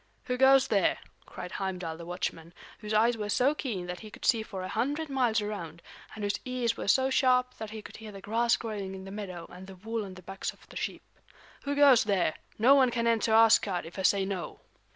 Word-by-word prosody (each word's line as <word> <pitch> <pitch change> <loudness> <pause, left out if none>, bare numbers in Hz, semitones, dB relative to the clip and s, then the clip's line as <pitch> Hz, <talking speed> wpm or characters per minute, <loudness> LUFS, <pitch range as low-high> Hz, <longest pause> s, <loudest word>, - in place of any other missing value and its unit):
"Who 250 - -2
goes 265 +1 +5
there!" 200 -4 +2 0.3
cried 180 -1 -8
Heimdal 180 -4 -4
the 170 +1 -10
watchman, 175 -1 -4 0.2
whose 210 0 -7
eyes 230 +2 +3
were 210 -1 -4
so 255 +7 +3
keen 225 -12 -4
that 180 0 -6
he 215 - -10
could - - -9
see 230 -3 +4
for 195 -4 -6
a - - -4
hundred 285 +10 -2
miles 245 -5 +1
around, 170 -6 -6 0.3
and 215 - -6
whose 205 0 -1
ears 250 -2 -1
were - - -6
so 265 +5 +3
sharp 255 -1 +3
that 220 -1 -5
he 215 0 -8
could - - -11
hear 220 -1 -9
the 195 - -9
grass 230 +4 +1
growing 205 -4 -5
in 190 0 -9
the 195 - -8
meadow 185 -5 -6
and 185 +1 -11
the 190 - -10
wool 220 +4 -4
on 190 -2 -9
the 185 - -13
backs 195 +2 -5
of - - -22
the - - -14
sheep. - - -4 0.6
"Who 285 0 -1
goes 280 -6 +6
there! 190 -6 +1 0.2
No 245 +6 +6
one 265 -3 +5
can 235 -1 -1
enter 230 -1 +2
Asgard 215 -5 +4
if 170 +4 -9
I - - 0
say 195 +1 +3
no." 190 -3 -5
215 Hz, 235 wpm, -29 LUFS, 190-240 Hz, 0.6 s, goes